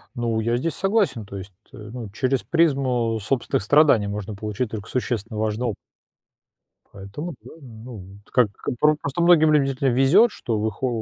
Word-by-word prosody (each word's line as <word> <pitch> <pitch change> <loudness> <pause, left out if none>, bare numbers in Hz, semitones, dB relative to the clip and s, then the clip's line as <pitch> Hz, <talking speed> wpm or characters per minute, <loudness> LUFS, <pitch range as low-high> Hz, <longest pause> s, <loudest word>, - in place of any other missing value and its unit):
Ну, 115 -2 -1
я 115 +2 0
здесь 165 +6 -2
согласен, 195 - 0
то 100 0 -8
есть, 95 +1 -9 0.2
э, - - -13
ну, 110 +1 -8
через 130 +5 -1
призму 130 -8 +1
собственных 115 -1 -1
страданий 140 -4 +4
можно 105 +1 -5
получить 105 +3 -4
только 105 -2 -7
существенно 115 -3 -3
важный 110 +2 -1
оп 110 - -2 1.2
Поэтому, 100 - -8
да, - - -12
ну, 110 -6 -11
как 125 -3 +4 0.3
пр 150 0 +4
просто 145 +3 -3
многим 165 -3 +5
любителям 135 -3 +1
везет, 160 - +5
что 115 - -3
в 110 - 0
их 110 +2 -7
о 130 - +1
120 Hz, 170 wpm, -23 LUFS, 110-140 Hz, 1.2 s, многим